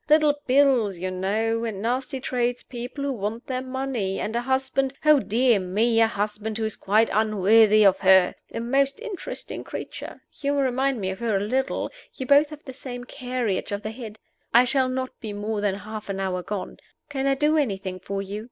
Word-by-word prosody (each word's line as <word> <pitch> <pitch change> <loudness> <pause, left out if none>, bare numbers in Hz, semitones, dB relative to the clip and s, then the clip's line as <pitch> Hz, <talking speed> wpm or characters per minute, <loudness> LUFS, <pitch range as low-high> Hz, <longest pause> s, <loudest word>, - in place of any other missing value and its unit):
Little 305 -1 +5
bills, 255 -7 +3
you 185 +2 -3
know, 220 +5 0
and 220 -4 -3
nasty 255 +5 -2
tradespeople 245 +1 -3
who 280 -1 0
want 220 +1 -4
their 255 -1 -2
money, 255 -7 -2
and 220 - -3
a 235 - +1
husband 265 +1 0
oh, 305 -1 +7
dear 240 -1 +3
me, 220 +5 +2
a 225 - +6
husband 210 0 -3
who 225 - -1
is 220 - -3
quite 215 +3 +2
unworthy 215 0 +5
of 195 -1 +5
her! 190 -1 +5 0.2
A - - -4
most 275 - +1
interesting 445 -5 -6
creature. - - -7
You 285 0 -1
remind 265 -1 +1
me 190 -2 -2
of 190 - -7
her 230 -3 0
a - - -1
little; 260 +6 -1 0.2
you 260 - -5
both 285 +3 +5
have 305 -1 -10
the 260 - -7
same 245 -2 -7
carriage 250 -7 -3
of 205 +1 -3
the 215 - -3
head. 220 -2 -8 0.4
I 240 - +9
shall 260 +1 +2
not 255 0 -2
be 215 -2 -5
more 205 +1 -3
than 205 -2 +1
half 215 +1 -8
an 195 0 -3
hour 185 -2 -1
gone. 200 +1 -5 0.3
Can 275 -1 -1
I 275 - +3
do 300 +3 +2
anything 195 -10 -1
for 195 +1 -4
you? 200 +2 -5
230 Hz, 200 wpm, -25 LUFS, 205-265 Hz, 0.4 s, I